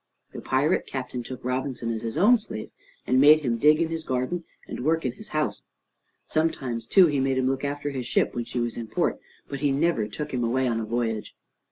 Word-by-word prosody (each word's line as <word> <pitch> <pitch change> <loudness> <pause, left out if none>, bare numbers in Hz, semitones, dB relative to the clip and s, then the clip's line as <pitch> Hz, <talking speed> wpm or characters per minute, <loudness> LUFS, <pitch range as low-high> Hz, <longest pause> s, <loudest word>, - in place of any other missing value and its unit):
The - - -7
pirate 145 +6 +1
captain 125 -2 -4
took 125 +1 -8
Robinson 125 -2 -2
as 110 - -4
his 115 -1 -4
own 235 +5 +6
slave, 110 - -7 0.3
and 130 +1 +3
made 155 +2 +8
him 120 -5 -1
dig 150 +4 +5
in 165 -1 +1
his 165 -1 -3
garden 130 +6 -2 0.2
and - - -5
work 160 +1 +1
in 125 - +1
his 215 - -12
house. 155 -4 -1 0.6
Sometimes, 130 -8 -1
too, 190 +7 +7
he 145 -4 +1
made 135 0 +1
him 130 0 +1
look 135 +1 -1
after 145 0 -2
his 130 -3 -4
ship - - +1
when 120 -1 -3
she 120 - -4
was 120 -1 -2
in 115 - -5
port, - - 0 0.3
but 140 - -5
he 145 0 +1
never 140 -6 +1
took 150 +7 -6
him 125 -1 0
away 130 +3 +1
on 115 -2 0
a 110 - -3
voyage. 115 -1 -2
130 Hz, 225 wpm, -26 LUFS, 120-150 Hz, 0.6 s, made